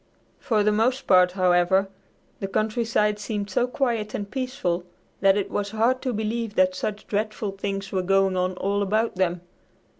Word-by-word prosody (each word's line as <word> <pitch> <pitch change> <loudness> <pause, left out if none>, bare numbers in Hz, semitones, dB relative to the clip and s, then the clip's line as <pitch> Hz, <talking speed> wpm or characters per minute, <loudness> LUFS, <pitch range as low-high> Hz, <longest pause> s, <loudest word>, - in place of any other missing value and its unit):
For 215 -4 +1
the 210 - +3
most 235 +5 +1
part, 180 -1 +5
however, 185 +1 +3 0.5
the 195 - -3
countryside 215 0 0
seemed 205 -1 -4
so 245 +6 +1
quiet 235 -5 -1
and 200 -1 -5
peaceful 255 -10 -2 0.4
that 195 0 +4
it 200 - -2
was 205 0 -2
hard 230 +4 +1
to 255 - -1
believe 220 0 -3
that 185 0 +3
such 205 +3 -4
dreadful 215 0 -2
things 195 0 -4
were 190 - 0
going 195 +1 +2
on 185 0 0
all 200 +2 -1
about 215 +1 0
them. 180 -2 0
205 Hz, 170 wpm, -24 LUFS, 190-220 Hz, 0.5 s, part